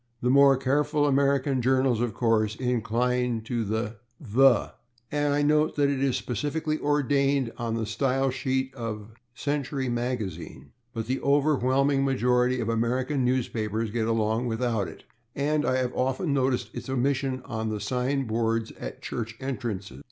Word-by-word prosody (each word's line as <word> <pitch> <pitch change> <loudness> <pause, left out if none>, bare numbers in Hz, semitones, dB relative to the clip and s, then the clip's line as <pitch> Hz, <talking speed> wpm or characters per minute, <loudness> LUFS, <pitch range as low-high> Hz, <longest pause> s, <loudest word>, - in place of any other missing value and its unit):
The 125 +1 +1
more 140 0 +6
careful 145 +3 +1
American 140 -1 +2
journals, 130 -1 +2
of 120 -3 -1
course, 110 -3 +1
incline 125 0 0
to 120 0 -2
the 110 +1 -3 0.2
/the/, 130 -2 +3 0.4
and 145 -1 +1
I 145 - +2
note 150 +1 +2
that 140 -1 +2
it 135 -1 -1
is 135 -2 +1
specifically 150 +7 -2
ordained 140 -3 +1
on 115 -2 -2
the 115 -1 -1
Style 135 +4 0
sheet 130 0 -1
of 110 -4 -5
the 120 +1 -26
/Century 140 -3 -2
Magazine/, 110 - -4 0.2
but 115 -1 -4
the 130 +3 -1
overwhelming 140 -1 +2
majority 125 -1 +2
of 115 - -2
American 125 +4 0
newspapers 115 -3 -1
get 110 0 -1
along 115 +1 0
without 115 -3 -1
it, - - -11 0.3
and 150 +2 0
I 130 - +2
have 125 -1 -1
often 135 +5 0
noticed 130 -2 0
its - - -7
omission 130 0 0
on 110 0 -3
the 105 -1 -3
sign 130 +5 -1
boards 115 0 -1
at - - -7
church 115 -1 -4
entrances. 120 -7 -4
125 Hz, 155 wpm, -26 LUFS, 115-135 Hz, 0.4 s, more